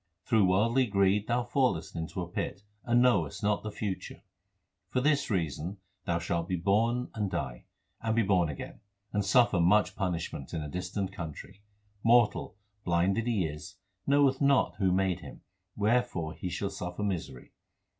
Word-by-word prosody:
Through 110 -5 +4
worldly 115 +7 +3
greed 100 0 +2
thou 120 +1 +1
fallest 120 - 0
into 85 +2 -4
a - - -6
pit, 95 +3 -4 0.2
and 120 +1 +3
knowest 100 - +2
not 105 0 +1
the 110 - -5
future. 100 -2 -5 0.7
Forthis 140 +3 +2
reason 85 -1 -2 0.3
thou 85 - +1
shalt 85 0 -2
be 95 - -1
born 115 +7 +1
and 105 -3 -2
die, 65 -7 -4 0.4
and 110 0 0
be 115 - +3
born 95 -5 +2
again, 70 - -7 0.3
And 105 0 +1
suffer 105 -1 +4
much 100 +5 +3
punishment 85 -6 -3
in 80 - -2
a - - -5
distant 95 +4 -4
country. 85 +2 -8 0.4
2 - - -3
Mortal, 120 -3 +3 0.3
blind 90 +2 +2
that 115 +1 -1
he 105 -7 +1
is, 75 +4 -7 0.3
knoweth 140 -1 +3
not 140 -10 +3
who 95 -3 +2
made 95 -1 +1
him; - - -11 0.3
wherefore 105 -7 0
he 90 - -5
shall 100 +3 -3
suffer 90 +2 -5
misery. 85 -10 -4
100 Hz, 165 wpm, -30 LUFS, 85-115 Hz, 0.7 s, Through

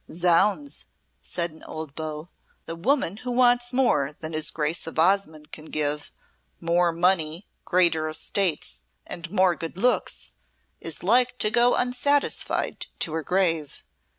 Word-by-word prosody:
"Zounds," 180 - +1 0.3
said 170 -1 -2
an 160 - -17
old 155 -3 -7
beau, 155 +1 -6 0.4
"the 165 - -5
woman 205 - 0
who 250 +3 -7
wants 245 0 +3
more 150 - +1
than 160 0 -6
his 155 0 +2
Grace 155 +2 -2
of 165 - -6
Osmonde 160 -3 +1
can 155 - -9
give 150 -1 -2 0.5
more 170 +1 +2
money, 170 0 +1 0.2
greater 170 -3 +2
estates, 165 +1 -1 0.2
and 170 -1 -6
more 185 -2 +3
good 165 +2 -7
looks 245 +5 0 0.5
is 165 0 -3
like 245 +5 +3
to 215 - +2
go 240 +1 +4
unsatisfied 250 +3 0
to 160 - -1
her 160 - -1
grave. 165 -4 0
170 Hz, 140 wpm, -25 LUFS, 155-215 Hz, 0.5 s, go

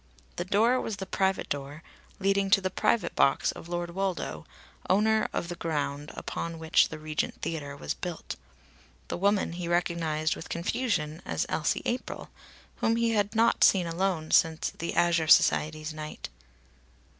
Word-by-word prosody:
The 175 - -2
door 225 +6 +3
was 220 - -3
the 190 - -5
private 190 +1 0
door 145 +3 -5 0.3
leading 195 0 +1
to 200 +1 +6
the 185 -1 -2
private 230 - +1
box 135 - +3
of 170 - -11
Lord 175 0 -3
Woldo, 190 0 -3 0.4
owner 220 +3 +3
of - - -2
the 175 - -4
ground 150 -3 -3
upon 165 0 -4
which 160 0 +3
the 160 - -6
Regent 155 0 -3
Theatre 145 -4 -4
was 75 - -3
built. - - -6 0.7
The - - -2
woman 200 +1 +2
he 175 0 -5
recognised 165 -2 0
with - - -9
confusion 170 -4 -1
as - - -1
Elsie 155 - 0
April, 245 +2 -3 0.5
whom 225 - +2
he 230 0 +2
had 210 0 0
not 225 +1 +4
seen 185 -3 +5
alone 170 -1 -1
since 160 -1 +3
the 170 - -5
Azure 170 -2 +3
Society's 155 0 +4
night. 155 0 -7
170 Hz, 155 wpm, -28 LUFS, 155-195 Hz, 0.7 s, to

